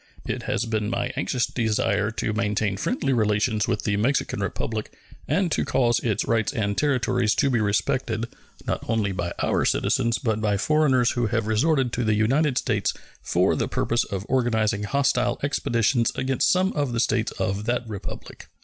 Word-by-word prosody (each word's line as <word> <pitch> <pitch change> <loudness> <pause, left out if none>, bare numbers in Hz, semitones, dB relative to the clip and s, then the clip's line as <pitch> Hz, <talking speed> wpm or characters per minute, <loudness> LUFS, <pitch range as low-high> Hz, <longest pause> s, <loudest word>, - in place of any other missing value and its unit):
It - - -3
has - - 0
been 110 -2 -1
my 120 - -1
anxious 130 -3 0
desire 105 -2 0
to 110 -1 -2
maintain 105 -2 0
friendly 140 - -1
relations 105 -1 +1
with - - -1
the 100 -1 0
Mexican 125 +7 0
Republic 110 -1 -3 0.4
and 185 -3 +1
to - - +1
cause 120 -2 +2
its 110 -5 -1
rights 115 -2 +1
and 105 -6 -1
territories 125 -5 +1
to 140 +2 +2
be 120 - +2
respected, 110 +2 0 0.4
not - - -2
only 110 -3 +1
by 90 -2 -3
our - - +1
citizens, 115 0 +1
but 110 -2 -1
by 105 -2 +1
foreigners 130 -1 +3
who 120 -2 0
have 115 0 -1
resorted 130 +3 +1
to 125 - -1
the 110 -1 +2
United 130 +6 +2
States - - 0 0.3
for - - +2
the - - -1
purpose 120 +1 0
of 100 -1 -5
organizing 110 -5 +1
hostile 125 -1 +1
expeditions 120 -4 +1
against 130 0 +1
some 185 +1 +2
of 145 -5 -1
the 115 - -1
States 115 -1 +1
of 100 +2 -2
that 120 0 -1
Republic. 105 -3 -8
115 Hz, 175 wpm, -24 LUFS, 105-130 Hz, 0.4 s, foreigners